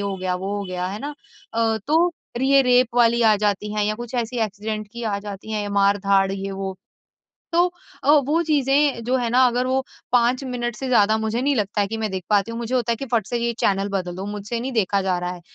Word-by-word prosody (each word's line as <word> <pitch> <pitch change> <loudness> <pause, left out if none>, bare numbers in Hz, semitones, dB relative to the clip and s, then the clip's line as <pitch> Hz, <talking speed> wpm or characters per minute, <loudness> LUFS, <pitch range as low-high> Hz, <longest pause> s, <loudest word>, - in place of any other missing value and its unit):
हो 200 -1 -2
गया 185 -1 -2
वो 195 +3 -3
हो 200 - -3
गया, 180 -1 -3
है 200 +3 -4
ना? 290 +4 -5 0.4
अ, 225 -1 +1
तो 335 +3 +3 0.2
रि 260 - 0
ये 275 0 +7
रेप 250 -1 +3
वाली 235 -1 +4
आ 220 -1 +6
जाती 210 0 -1
हैं 210 -1 0
या 215 - 0
कुछ 240 +2 -8
ऐसी 240 0 -2
एक्सीडेंट 215 +1 -5
की 235 - -7
आ 210 -3 -1
जाती 205 +1 -8
हैं 210 -1 -1
या 205 - -4
मार-धाड़ 200 -1 +3
ये 195 0 -4
वो 195 -1 -5 0.8
तो 345 +1 +4 0.4
अ, 285 - +4
वो 300 +3 +4
चीजें 285 -3 +2
जो 255 +2 +1
हैं 240 -2 0
ना 255 +2 +4
अगर 245 +1 0
वो 260 +1 +1 0.3
5 245 +2 +3
मिनट 240 -2 -3
से 265 - -4
ज़्यादा 220 -3 +4
मुझे 220 +2 -1
नहीं 285 0 +2
लगता 205 0 0
है 200 - +2
कि 225 - -3
मैं 215 -2 -2
देख 190 -1 -4
पाती 205 +1 +2
हूँ। 230 - -5
मुझे 235 +2 -3
होता 235 -2 +1
है - - -2
कि 275 +4 -6
फट 220 -4 +2
से 240 - -2
ये 235 0 0
चैनल 195 0 +1
बदल 185 -3 -3
दो 190 - -5
मुझसे 210 +3 -4
नहीं 260 +2 -4
देखा 200 -3 +1
जा 185 -2 0
रहा 180 0 -3
है। 175 - -11
220 Hz, 255 wpm, -22 LUFS, 200-250 Hz, 0.8 s, ये